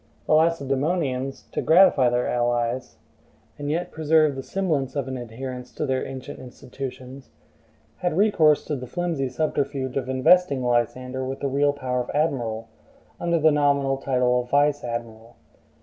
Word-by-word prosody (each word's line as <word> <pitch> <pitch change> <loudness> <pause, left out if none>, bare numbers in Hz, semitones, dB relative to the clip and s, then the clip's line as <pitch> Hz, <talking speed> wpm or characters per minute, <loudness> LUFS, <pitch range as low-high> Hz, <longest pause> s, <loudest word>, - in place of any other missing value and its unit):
The - - +1
Lacedaemonians, 140 -3 0
to - - -2
gratify 165 -7 +5
their 120 0 0
allies, 120 +1 -1 0.6
and 145 0 -4
yet 175 +3 -2
preserve 155 -2 +2
the 135 - -4
semblance 155 -6 -2
of 140 -2 -2
an 130 - -4
adherence 125 +1 -7
to 150 - -3
their 130 -2 -1
ancient 135 -1 -8
institutions, 130 +1 -9 0.7
had 175 -2 -2
recourse 165 -8 +4
to 150 - -2
the 125 -2 -7
flimsy 165 -3 -2
subterfuge 135 -1 -2
of 130 -1 -3
investing 135 +1 +3
Lysander 125 +2 -1
with 135 +1 -4
the 140 - 0
real 145 +2 +2
power 130 -3 -3
of 125 - -7
admiral, 120 -7 -1 0.5
under 170 -1 +1
the 160 0 +4
nominal 140 -2 +2
title 125 -2 +1
of 125 - -11
vice 145 +1 +2
admiral. 115 -1 -6
135 Hz, 150 wpm, -24 LUFS, 125-150 Hz, 0.7 s, gratify